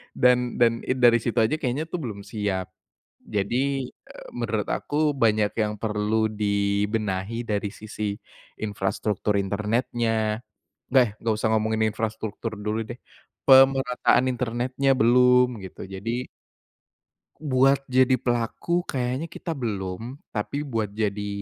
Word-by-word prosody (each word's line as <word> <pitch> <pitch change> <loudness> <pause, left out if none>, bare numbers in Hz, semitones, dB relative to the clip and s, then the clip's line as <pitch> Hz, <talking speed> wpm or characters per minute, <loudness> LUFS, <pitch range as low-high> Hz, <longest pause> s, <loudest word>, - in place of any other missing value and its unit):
dan 125 -1 +3
dan 120 -1 +5
i - - +2
dari 120 -2 +6
situ 115 +1 -3
aja 110 +8 +2
kayaknya 135 +2 -1
tuh 180 - -3
belum 110 -7 -5
siap. 100 -3 -3 0.5
Jadi, 130 +6 -1
eee, - - -14
menurut 110 -3 -1
aku 150 +1 0
banyak 110 -4 +2
yang 105 -1 0
perlu 110 0 +1
dibenahi 105 +1 -1
dari 105 -1 -1
sisi 105 -1 -4 0.5
infrastruktur 105 0 -1
internetnya. 110 +2 0 0.5
Eh, 125 -4 +6
enggak 115 -1 0
usah 110 0 0
ngomongin 110 0 +1
infrastruktur 110 0 -4
dulu 105 +2 -2
deh, 120 +2 -8 0.5
pemerataan 130 -1 +5
internetnya 125 +2 0
belum, 125 0 +4
gitu, 90 -4 -9
jadi 115 +6 -4 1.1
Buat 135 -2 +3
jadi 130 0 +3
pelaku 125 +8 -1
kayaknya 130 +3 -2
kita 165 0 -6
belum, 110 +2 -4
tapi 110 +6 -3
buat 115 -8 -2
jadi, 105 -1 -2
115 Hz, 120 wpm, -25 LUFS, 105-125 Hz, 1.1 s, dari